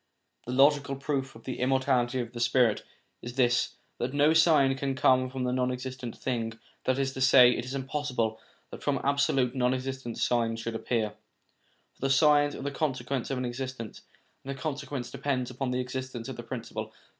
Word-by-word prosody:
The - - -3
logical 140 +1 +4
proof 135 -1 -3
of 115 - -13
the 130 - -5
immortality 130 -1 +2
of 120 0 -7
the 120 - -6
spirit 120 -1 +3 0.4
is 120 +1 -7
this, 120 -2 +2 0.2
that 125 +3 -2
no 145 +2 +5
sign 155 -5 +5
can 135 0 -2
come 130 0 +3
from 130 -1 -3
a 125 - 0
non 125 0 +1
existing 125 -1 -5
thing; 115 -3 -2 0.3
that 130 0 +2
is 135 -1 0
to 130 - -5
say, 125 -1 +8
it 120 - -2
is 130 +2 -5
impossible 130 -5 -2 0.3
that - - -9
from 140 -2 0
absolute 135 -3 +2
non 125 -1 +2
existence 130 -2 -4
signs 115 -2 +1
should 115 0 -4
appear, 115 -1 -1 0.8
for - - -30
the 135 - +1
signs 145 +1 +4
are - - -7
the 140 - -2
consequence 135 -3 -2
of 135 - -1
an 125 - -2
existence, 125 -2 -5 0.4
and 135 - -9
the 135 -1 -4
consequence 140 -4 -4
depends 130 -3 -2
upon 125 +1 -3
the 125 0 -1
existence 130 -1 -4
of 135 - -5
the 120 - -6
principle. 115 -2 -6
130 Hz, 190 wpm, -29 LUFS, 120-135 Hz, 0.8 s, say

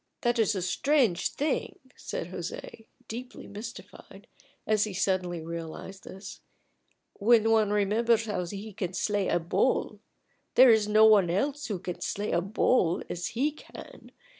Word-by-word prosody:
"That 240 -1 +1
is 220 -1 +2
a 185 - -2
strange 240 - +2
thing," 295 -1 -2 0.2
said 170 - -6
José, 185 +5 -7 0.2
deeply 245 +3 -8
mystified, 220 +4 -10 0.4
as 215 -1 +2
he 205 -3 -6
suddenly 180 -3 -1
realized 170 +3 -7
this, 190 +2 -10 0.8
"when 225 +1 +4
one 220 -2 +3
remembers 220 +3 +2
how 205 -4 -2
he 205 +3 -7
can 190 -3 -4
slay 205 +1 0
a - - +2
bull. 165 0 0 0.6
There 255 -1 +8
is 220 -2 +3
no 215 +1 +6
one 205 -5 +6
else 275 +10 -1
who 205 -4 -2
can 180 0 -6
slay 205 +1 -2
a 170 - +2
bull 185 -2 +1
as 175 0 -3
he 290 +5 +2
can. 305 - -13
210 Hz, 150 wpm, -28 LUFS, 185-225 Hz, 0.8 s, There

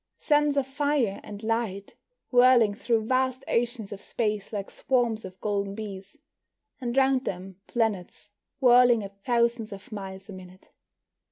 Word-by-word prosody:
Suns 295 -1 +2
of 275 - +2
fire 275 -6 0
and 205 +1 -9
light, 220 -3 -2 0.4
whirling 245 -4 +6
through 225 0 0
vast 260 +1 0
oceans 235 -3 -1
of 200 - -7
space 210 -3 -2
like 200 -2 -5
swarms 240 -5 0
of 185 0 -11
golden 200 -1 -1
bees. 200 -2 -8 0.6
And 245 -1 -3
round 265 -1 +3
them 190 +1 -6
planets 210 -3 -2 0.3
whirling 245 -3 +6
at 200 0 -11
thousands 235 -2 +1
of 195 +1 -10
miles 195 -2 -7
a 205 - -9
minute. 185 0 -13
220 Hz, 145 wpm, -27 LUFS, 200-250 Hz, 0.6 s, whirling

